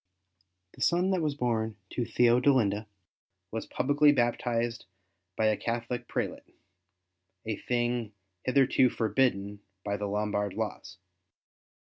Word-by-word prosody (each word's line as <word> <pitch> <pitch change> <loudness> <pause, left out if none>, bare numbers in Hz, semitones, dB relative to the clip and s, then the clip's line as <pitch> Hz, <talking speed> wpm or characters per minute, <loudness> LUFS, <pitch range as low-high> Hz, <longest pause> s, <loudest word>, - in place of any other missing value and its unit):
The - - -15
son 180 +3 +2
that 185 -2 +1
was 150 -3 -1
born 115 -4 -1
to - - -2
TheodeHnda 120 -3 +3 0.6
was 110 0 -4
pubHcly 145 +2 +3
baptized 120 -1 0 0.5
by 110 - +1
a 110 0 +4
CathoHc 115 +1 -3
prelate, - - -4 0.9
a 110 -2 -2
thing 120 -2 -1 0.3
hitherto 130 -1 +4
forbidden 105 -3 0 0.3
by 100 0 -1
the 105 - -3
Lombard 105 -1 -1
laws. 95 -5 -5
115 Hz, 110 wpm, -29 LUFS, 105-125 Hz, 0.9 s, a